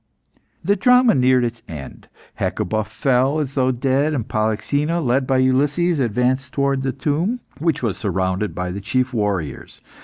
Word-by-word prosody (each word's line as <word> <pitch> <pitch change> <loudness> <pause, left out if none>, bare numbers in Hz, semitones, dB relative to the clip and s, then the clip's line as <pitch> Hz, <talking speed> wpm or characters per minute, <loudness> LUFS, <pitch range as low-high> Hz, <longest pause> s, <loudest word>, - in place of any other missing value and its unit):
The 200 +4 +2
drama 250 +3 +5
neared 130 -1 +3
its 120 -1 -3
end. 75 -4 -9 0.3
Hecuba 110 +3 -1
fell 130 +6 +1
as 140 -3 -3
though 130 -2 +2
dead, 135 +4 +1
and 120 -5 -3
Polyxena, 110 +10 0
led 130 -2 +1
by 135 - +2
Ulysses, 145 +6 +2
advanced 130 +3 0
towards 140 -1 0
the 135 - 0
tomb, 160 - -1 0.2
which 155 -3 0
was 110 -5 -1
surrounded 95 +2 -1
by 90 0 -3
the 100 +2 -5
chief 130 +6 -1
warriors. 100 - -3
130 Hz, 155 wpm, -20 LUFS, 110-145 Hz, 0.3 s, drama